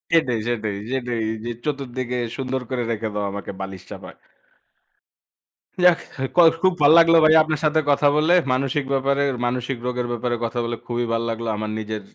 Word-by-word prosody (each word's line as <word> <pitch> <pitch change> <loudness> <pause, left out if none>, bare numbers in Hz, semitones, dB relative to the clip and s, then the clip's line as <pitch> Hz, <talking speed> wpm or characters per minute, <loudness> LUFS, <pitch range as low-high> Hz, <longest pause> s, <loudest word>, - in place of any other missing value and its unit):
সেটাই, 125 -8 +2
সেটাই, 110 -4 -2 0.2
সেটাই 125 -3 -2 0.3
যে, - - -3 0.2
চতুর্দিকে 130 -3 -3 0.2
সুন্দর 130 0 -3
করে 125 -2 -2
রেখে 110 0 -3
দাও 105 - -1
আমাকে 100 0 -6
বালিশ 95 -1 -7
চাপা। - - -9 1.7
যাক 180 -1 +6 0.4
কল 170 -2 +7
খুব 185 -1 +3
ভাল 145 +1 +6
লাগলো 165 0 +6
ভাইয়া 155 +1 +7
আপনার 155 -1 -2
সাথে 155 +1 +3
কথা 145 0 +3
বলে। 155 +3 +3 0.2
মানসিক 135 +2 -1
ব্যাপারে, 140 +1 +1 0.2
মানসিক 125 +1 -2
রোগের 125 -1 -2
ব্যাপারে 120 0 -2
কথা 120 +1 -3
বলে 120 0 -3
খুবই 120 0 -2
ভাল 115 - 0
লাগলো 115 0 -4
আমার 110 0 -4
নিজের 110 -1 -5
125 Hz, 170 wpm, -22 LUFS, 115-145 Hz, 1.7 s, কল